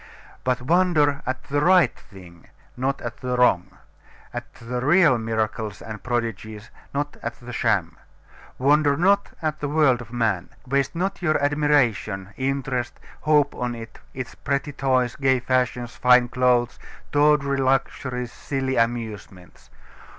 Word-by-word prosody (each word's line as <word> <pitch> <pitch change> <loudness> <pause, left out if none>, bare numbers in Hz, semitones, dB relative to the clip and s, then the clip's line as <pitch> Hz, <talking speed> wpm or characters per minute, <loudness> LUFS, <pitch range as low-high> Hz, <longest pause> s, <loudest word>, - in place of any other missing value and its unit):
But 125 -1 0
wonder 155 -2 +2
at 130 0 -3
the 145 0 -1
right 180 +2 +5
thing, 90 -4 -16 0.3
not 135 +2 -2
at 120 -1 -6
the 125 -1 -3
wrong; 95 -7 +3 0.6
at - - -6
the 125 +2 -5
real 150 -4 +5
miracles 110 -2 -2
and 110 -1 -8
prodigies, 115 -3 -4 0.2
not 145 +1 -3
at - - -4
the 125 -1 -9
sham. 105 -8 0 0.6
Wonder 145 +1 +3
not 200 +3 +3
at 155 -1 -1
the 145 - -3
world 145 -5 +3
of 115 -2 -11
man. 110 -7 -1 0.2
Waste 140 +3 0
not 190 +3 -2
your 155 -3 +2
admiration, 140 -9 +1
interest, 130 -2 -2 0.2
hope 150 -2 +3
on 125 -1 -3
it, 115 -1 -10 0.2
its 130 -2 -6
pretty 140 +1 -2
toys, 130 -3 0
gay 130 -2 +2
fashions, 125 -1 -1
fine 125 -1 +5
clothes, 125 -1 +1 0.3
tawdry 145 -1 +3
luxuries, 130 -2 -1
silly 135 -1 -3
amusements. 110 -6 -3
130 Hz, 135 wpm, -23 LUFS, 115-145 Hz, 0.6 s, right